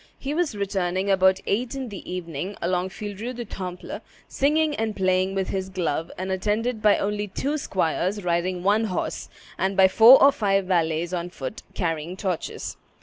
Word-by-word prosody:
He 275 +2 -4
was 320 -7 0
returning 190 -1 -1
about 190 0 +4
eight 235 +6 -1
in 265 -3 -4
the 195 -3 -8
evening 180 +1 -5
along 180 +1 0
Vieille 205 +1 -6
Rue 240 +3 -4
du 240 -1 -6
Temple, 180 -3 -6 0.3
singing 300 +2 +1
and 220 -3 -2
playing 185 0 +1
with 190 -1 -1
his 190 -1 -3
glove, 170 -3 -2
and 190 +1 -3
attended 215 +5 -1
by 210 -1 +5
only 205 +1 -2
two 275 +9 -2
squires 190 - -1
riding 175 +1 0
one 210 +3 +3
horse, 185 -5 -3 0.3
and 190 +1 0
by 190 -1 +7
four 225 +7 +8
or 275 - +7
five 195 -5 +1
varlets 170 -1 0
on 175 0 -2
foot, 135 -7 -6
carrying 165 0 -2
torches. 185 -4 -4
190 Hz, 175 wpm, -24 LUFS, 180-215 Hz, 0.3 s, four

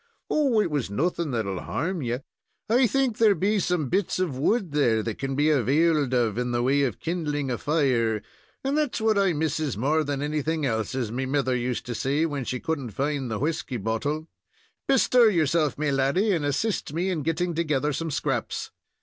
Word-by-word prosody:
"Oh! 275 -7 +3
it 190 -6 +1
was 145 -8 -1
nothing 165 - -1
that 115 -5 -1
will 95 -2 -3
harm 180 +1 -2
ye: 120 -2 -1 0.5
I 240 +3 +4
think 260 -2 0
there 215 -3 +5
be 205 +3 +1
some 180 -6 0
bits 190 +6 0
of 180 -7 -1
wood 185 - +1
there 120 -7 +2
that 115 -2 -4
kin 135 0 -2
be 150 +2 +3
availed 150 +1 +2
of 120 -3 +1
in 125 0 -1
the 120 0 0
way 140 +3 +3
of 130 -6 -1
kindling 150 -5 -2
a 120 - -1
fire, 125 -8 +1 0.4
and 270 +2 0
that's 300 -5 0
what 220 -2 +2
I 195 -3 +3
misses 155 -4 -1
more 150 +7 +2
than 145 -1 -2
anything 155 +1 -1
else, 110 -2 -1
as 120 -5 -2
me 130 +2 -2
mither 130 -2 +1
used 125 0 -2
to 125 - -4
say 140 +7 0
when 145 -5 -3
she 125 - -3
couldn't 140 -5 -3
find 140 +1 -1
the 110 - -2
whisky 145 -1 -2
bottle. 130 +9 -2 0.6
Bestir 250 -3 +5
yourself, 160 -4 +1
me 150 -1 0
laddy, 140 +11 +2
and 165 -6 0
assist 145 +3 -1
me 180 +4 0
in 165 -4 -2
getting 165 +4 -1
together 150 -3 0
some 165 +4 -3
scraps." 140 -5 -2
150 Hz, 200 wpm, -26 LUFS, 130-170 Hz, 0.6 s, there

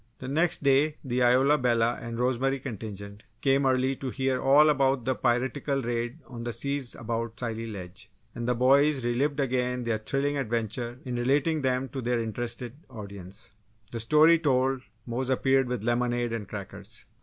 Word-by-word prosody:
The 130 - -8
next 160 +4 +1
day, 140 +2 +3
the 125 -2 -1
Isola 130 +4 +4
Bella 120 -1 +2
and 115 0 -5
Rosemary 130 +2 +1
contingent 105 -5 -7 0.2
came 135 +1 +2
early 130 +1 +2
to 135 - -4
hear 130 0 -1
all 145 +3 +6
about 135 -4 +2
the 130 - +2
piratical 130 +3 0
raid 120 -1 -3
on 120 -2 -8
the 120 0 -3
seas 140 +1 -3
about 115 0 -4
Scilly 115 -2 -3
Ledge; 95 -1 -8 0.2
and 120 0 -4
the 125 - +2
boys 135 +2 +4
relived 140 +5 0
again 125 -2 0
their 115 -2 -1
thrilling 140 +5 -1
adventures 120 -1 -2
in 125 -1 -3
relating 145 +6 +1
them 130 0 0
to 135 -1 -5
their 120 0 0
interested 115 +1 -4 0.2
audience. 100 -4 -8 0.4
The 115 - -4
story 155 +8 +5
told, 135 -3 +1 0.2
Mose 125 +2 -3
appeared 135 0 +2
with 125 -4 -3
lemonade 120 0 0
and 105 -4 -4
crackers. 100 +2 -8
125 Hz, 165 wpm, -27 LUFS, 115-135 Hz, 0.4 s, all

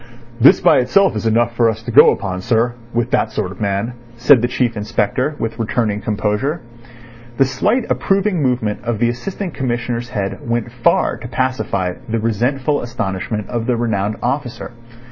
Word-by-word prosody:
"This 130 +4 +7
by - - +5
itself 190 - +3
is 110 +1 -2
enough 120 +1 +1
for 115 -1 +3
us 110 0 -4
to 120 - -5
go - - +8
upon, 95 -3 -2
sir, 115 +3 +1 0.2
with 120 +1 -1
that - - +1
sort 90 - -3
of 95 - -11
man," 100 +3 -1 0.2
said 125 +1 +5
the 120 - +1
Chief 125 -2 -1
Inspector, 115 +6 -1
with 115 +1 -4
returning 110 -2 -1
composure. 110 +9 -1 0.8
The 135 - +5
slight 225 - 0
approving 195 -3 +1
movement 125 -6 -1
of 120 -1 -1
the 120 +2 +2
Assistant 180 - -5
Commissioner's 120 -2 -3
head 100 -5 -3
went 120 0 -1
far 120 -1 +1
to 125 - -8
pacify 120 -8 -1 0.2
the 115 - 0
resentful 125 +6 0
astonishment 105 -3 -3
of 115 -1 -3
the 125 -2 +1
renowned 105 -3 -1
officer. 125 0 -3
120 Hz, 170 wpm, -18 LUFS, 110-130 Hz, 0.8 s, go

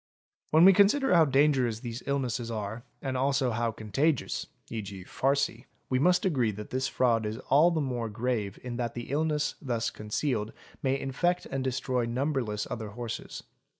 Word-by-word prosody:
| - - -47
When 160 +3 +6
we 195 - +9
consider 210 +6 +4
how 165 -2 +7
dangerous 135 -5 +2
these 120 -1 -5
illnesses 125 -4 -1
are 110 +1 -4 0.2
and 135 -2 -2
also 135 -1 +1
how 115 0 0
contagious 125 +7 -1 0.2
(¢.g., 100 -4 -6
farcy), 135 -2 0 0.3
we 130 - +3
must 180 +5 +3
agree 130 -11 +2
that 105 +1 -8
this 130 +1 0
fraud 120 -4 +2
is 105 +1 -3
all 150 +5 +6
the 165 -3 0
more 120 -5 -2
grave 110 -3 -2
in 120 -1 -5
that 120 -1 -3
the 120 +1 -6
illness 150 0 0
thus 120 -5 -1
concealed 105 +1 -2 0.3
may 135 0 +1
infect 175 +8 0
and 135 -1 -3
destroy 130 -1 -1
number 135 +4 0
less 105 -2 -3
other 110 -3 -4
horses. 115 +2 -6
125 Hz, 175 wpm, -29 LUFS, 115-140 Hz, 0.3 s, we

